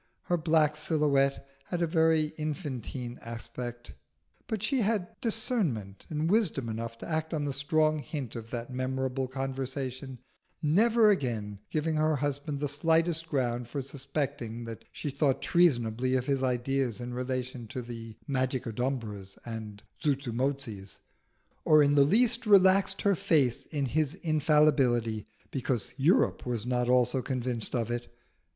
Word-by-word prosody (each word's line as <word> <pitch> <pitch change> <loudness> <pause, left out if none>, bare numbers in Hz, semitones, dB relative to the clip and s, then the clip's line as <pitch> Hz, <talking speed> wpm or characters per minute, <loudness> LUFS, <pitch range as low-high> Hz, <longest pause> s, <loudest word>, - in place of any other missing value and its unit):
Her 175 - +1
black 155 -2 +3
silhouette 140 -3 +1 0.2
had 175 -1 -2
a - - +4
very 160 -2 +2
infantine 135 - -4
aspect, 120 +1 -7 0.5
but 215 -3 -3
she 265 +4 +2
had 205 -4 0
discernment 190 - -1
and 155 0 -1
wisdom 170 - +1
enough 115 +1 -4
to - - -8
act 160 0 -1
on 150 -2 -1
the 140 - -2
strong 155 +2 +2
hint 135 -3 -5
of 115 -1 -7
that 120 +1 -5
memorable 130 0 -1
conversation, 135 0 -4 0.4
never 215 +8 +4
again 110 - -2
giving 155 0 0
her 155 0 +2
husband 145 +1 -2
the 145 - 0
slightest 165 +3 +1
ground 120 -4 -1
for 140 - -4
suspecting 135 -3 -4
that 115 -1 -8
she 145 - -4
thought 140 -1 +1
treasonably 130 -7 +2
of 125 -1 0
his 135 -1 0
ideas 130 -1 0
in 120 0 -5
relation 125 -1 -3
to 125 +3 -5
the 115 -2 -8
Magicodumbras 125 -6 -2
and 110 -3 -7 0.2
Zuzumotzis, 130 -6 -2 0.7
or 155 -1 +6
in 145 0 +3
the 145 - +6
least 230 - +3
relaxed 195 -1 +5
her 200 - +4
faith 140 -6 +1
in 145 -3 0
his 150 +4 0
infallibility 150 - +2 0.2
because 130 -4 -2
Europe 145 +7 +3
was 120 -3 -3
not 125 -1 0
also 125 +1 +3
convinced 125 -3 -2
of 115 -1 -1
it. 120 0 -4
135 Hz, 140 wpm, -29 LUFS, 120-155 Hz, 0.7 s, or